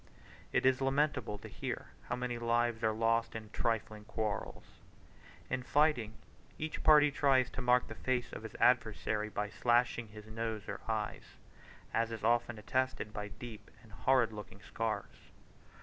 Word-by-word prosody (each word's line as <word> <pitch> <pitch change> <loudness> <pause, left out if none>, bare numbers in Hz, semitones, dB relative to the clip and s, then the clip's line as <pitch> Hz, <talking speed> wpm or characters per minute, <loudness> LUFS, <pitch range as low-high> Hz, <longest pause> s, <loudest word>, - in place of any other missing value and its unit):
It - - +2
is 130 0 +4
lamentable 135 -5 +1
to - - -10
hear - - -5 0.2
how 120 - +1
many 125 -1 -3
lives 120 0 +1
are 110 - +4
lost 115 +1 +1
in 110 -1 -7
trifling 110 -2 -1
quarrels. 110 -2 -3 0.8
In 130 - -1
fighting, 135 -5 +2 0.4
each 155 0 -4
party 150 -1 +7
tries 135 -3 +3
to 135 - -4
mark 125 0 +4
the - - -6
face 125 -2 -1
of - - -6
his 110 0 -8
adversary 110 -3 +2
by 105 0 -2
slashing 120 -1 +2
his 105 0 -11
nose 110 -1 -4
or 100 - -5
eyes; 110 -2 -3 0.6
as 115 0 +1
is 110 -2 -6
often 120 0 +2
attested 125 -1 -1
by 105 -1 -4
deep 105 0 -10
and 110 - -17
horrid 115 +2 +2
looking 105 -1 -9
scars. 115 -1 -4
115 Hz, 155 wpm, -34 LUFS, 110-125 Hz, 0.8 s, party